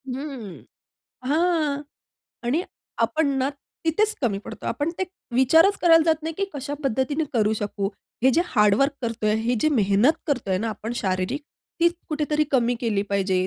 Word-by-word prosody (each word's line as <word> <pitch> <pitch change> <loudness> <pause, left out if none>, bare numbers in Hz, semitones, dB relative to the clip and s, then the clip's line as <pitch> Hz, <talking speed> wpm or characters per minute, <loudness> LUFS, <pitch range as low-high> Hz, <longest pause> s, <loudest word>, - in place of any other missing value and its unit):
हं, 265 - -6 0.7
हां 310 -2 +1 0.7
आणि 305 +9 +1 0.4
आपण 310 -2 +2
ना 260 +1 +1 0.4
तिथेच 420 +7 +2
कमी 205 -6 +1
पडतो. - - -8
आपण 290 +8 -1
ते 375 - +1 0.3
विचारच 325 +10 +5
करायला 330 -2 +7
जात 320 -1 +2
नाही, 320 0 -4
की 395 - +2
कशा 285 +1 -4
पद्धतीने 270 +5 0
करू 215 -2 +2
शकू. 205 -1 -2 0.3
हे 260 - +6
जे 335 - +4
हार्ड 210 - +4
वर्क 275 +5 +2
करतोय, 220 -2 0
हे 230 +3 0
जे 310 - +3
मेहनत 215 - +3
करतोय 225 -10 0
ना 225 +3 -2
आपण 220 +2 -5
शारीरिक 190 +7 -1 0.4
ती 340 - +6 0.2
कुठेतरी 305 0 0
कमी 245 -2 +2
केली 210 -4 0
पाहिजे. 190 -2 +1
265 Hz, 160 wpm, -24 LUFS, 215-310 Hz, 0.7 s, करायला